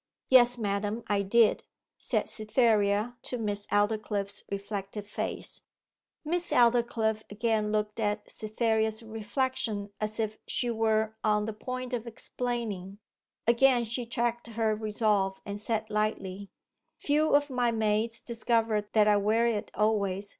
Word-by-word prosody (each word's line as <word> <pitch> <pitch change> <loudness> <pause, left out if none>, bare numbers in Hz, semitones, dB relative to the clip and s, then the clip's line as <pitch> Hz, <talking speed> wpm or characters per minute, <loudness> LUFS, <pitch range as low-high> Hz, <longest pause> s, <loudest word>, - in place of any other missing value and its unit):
'Yes, 245 -1 +6
madam, 205 +1 -2
I 205 -1 +1
did,' 215 +3 +3 0.4
said - - -1
Cytherea 215 0 +1
to 250 - -4
Miss 205 -2 -3
Aldclyffe's 205 -1 0
reflected 200 0 -5
face. 210 - -4 0.6
Miss 345 +3 -1
Aldclyffe 235 -2 +3
again 215 0 0
looked 210 0 -1
at 210 -1 0
Cytherea's 220 0 -1
reflection 225 -2 -2
as 215 +1 -3
if 220 -1 -2
she 240 -1 0
were 220 -1 +1
on 210 -1 +2
the 220 - -3
point 255 +3 -5
of 235 -1 -3
explaining. 225 -5 -4 0.5
Again 240 +1 +4
she 235 +1 -3
checked 235 0 -1
her 225 -1 0
resolve, 210 -3 0
and 200 0 -5
said 220 0 -2
lightly 200 -2 -2 0.5
'Few 300 +1 +2
of 290 -1 +2
my 245 -2 +2
maids 220 +1 0
discover 230 -2 0
that 215 -1 +5
I 210 -1 +5
wear 215 +3 +2
it 225 -3 -1
always. 205 -2 0
220 Hz, 130 wpm, -29 LUFS, 210-235 Hz, 0.6 s, Yes